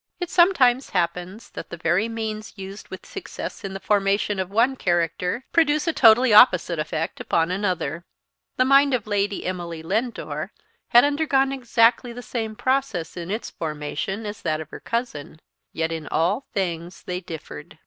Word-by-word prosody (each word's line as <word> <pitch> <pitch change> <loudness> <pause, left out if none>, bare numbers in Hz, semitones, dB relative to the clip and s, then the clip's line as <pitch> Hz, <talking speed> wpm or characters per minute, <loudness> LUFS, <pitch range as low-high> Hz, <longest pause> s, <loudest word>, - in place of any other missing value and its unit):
It 355 -1 -4
sometimes 275 -8 +4
happens 180 +3 -3
that - - -8
the 170 - -7
very 175 +7 +1
means 220 -1 -5
used 195 +1 -8
with 190 - -10
success 390 - -7
in 195 -1 -5
the - - -4
formation 200 0 +1
of 185 -1 -2
one 235 +6 +2
character 180 +4 -1
produce 305 -2 +3
a 330 - +1
totally 230 0 +6
opposite 180 -7 +6
effect 155 +1 -3
upon 165 +1 0
another. 180 -4 -2 0.5
The 255 - +4
mind 275 0 +5
of 230 - -3
Lady 205 -1 -1
Emily 170 -3 -4
Lindore 225 +8 -3 0.3
had 240 - +6
undergone 285 -2 +2
exactly 240 -2 +2
the 245 +1 -8
same 220 -1 -4
process 255 -11 -1
in 175 0 -6
its 215 +4 -4
formation 155 +7 -4
as 205 0 -6
that 155 0 -1
of 155 -1 -8
her - - -8
cousin; 230 - -4 0.3
yet 160 0 -2
in 160 -2 -5
all 185 - 0
things 175 -2 -3
they 180 0 -3
differed. 165 -4 -9
205 Hz, 165 wpm, -23 LUFS, 175-245 Hz, 0.5 s, totally